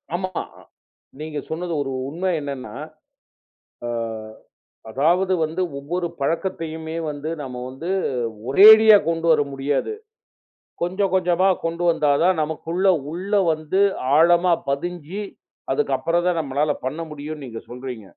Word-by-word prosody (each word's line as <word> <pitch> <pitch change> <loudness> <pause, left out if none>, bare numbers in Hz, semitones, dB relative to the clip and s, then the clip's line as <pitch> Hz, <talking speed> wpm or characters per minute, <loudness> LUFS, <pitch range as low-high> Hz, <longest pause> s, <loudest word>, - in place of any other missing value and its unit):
ஆமா, 185 +1 -3 0.9
நீங்க 155 -1 -5
சொன்னது 170 +1 -3
ஒரு 135 - -5 0.2
உண்மை 180 +5 -2
என்னன்னா, 140 -3 -6 1.1
அ - - -3 1.0
அதாவது 175 - +2
வந்து 160 +4 -3 0.2
ஒவ்வொரு 170 +5 -3
பழக்கத்தையுமே 160 0 -3
வந்து 145 +2 -5
நாம 125 -3 -6
வந்து 135 +7 -8 0.6
ஒரேடியா 215 +6 +9
கொண்டு 165 0 -1
வர 150 - +4
முடியாது. 140 - -1 0.9
கொஞ்சம் 190 +2 0
கொஞ்சமா 185 +1 +3 0.2
கொண்டு 170 +1 -2
வந்தா 155 -3 +2
தான் 185 -2 +3
நமக்குள்ள 165 +4 -2 0.3
உள்ள 190 +4 -6 0.2
வந்து 155 +4 -1 0.4
ஆழமா 175 +2 +5 0.2
பதிஞ்சு, 175 +6 -3 0.5
அதுக்குப்புறம் 175 - 0
தான் 175 -2 +1
நம்மளால 145 +1 0
பண்ண 150 +5 -3
முடியும்ன்னு 150 -1 -7
நீங்க 115 -1 -8
சொல்றீங்க! 125 -2 -7
165 Hz, 115 wpm, -22 LUFS, 145-180 Hz, 1.1 s, ஒரேடியா